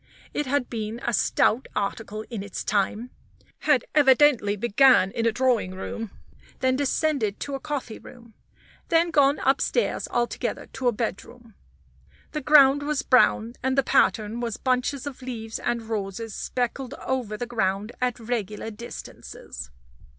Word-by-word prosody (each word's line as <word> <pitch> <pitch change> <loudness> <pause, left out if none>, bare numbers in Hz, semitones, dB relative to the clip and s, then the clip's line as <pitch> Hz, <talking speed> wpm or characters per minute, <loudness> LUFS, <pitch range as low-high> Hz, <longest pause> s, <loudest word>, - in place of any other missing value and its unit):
It 295 - -2
had 265 -1 0
been 220 0 -4
a 240 - 0
stout 225 +4 +2
article 215 +1 -3
in 225 -4 -4
its 200 -1 -5
time, 210 +4 -1 0.5
had 285 -6 +2
evidently 270 -7 +5
began 235 -1 +4
in 230 +2 0
a - - +3
drawing 230 -6 +1
room; 225 +3 -5 0.5
then 260 0 +2
descended 275 -5 0
to 285 - -4
a 270 - -2
coffee 270 -6 -5
room; 235 -2 -15 0.6
then 335 0 +3
gone 285 -2 +4
upstairs 275 - +1
altogether 240 0 -2
to 255 - -2
a - - +5
bedroom. 230 +1 -5 0.8
The 300 - -3
ground 285 -1 +6
was 300 +1 -1
brown, 235 -2 +3
and 260 +1 0
the 275 - +4
pattern 220 -2 +2
was 235 -3 -3
bunches 255 +2 0
of 280 -2 -7
leaves 225 -3 -5
and 240 -1 -2
roses 220 0 -4
speckled 250 +3 -3
over 245 -5 -3
the 245 - -3
ground 210 -2 -1
at 250 -1 0
regular 220 -2 -3
distances. 205 - -9
240 Hz, 145 wpm, -25 LUFS, 220-270 Hz, 0.8 s, ground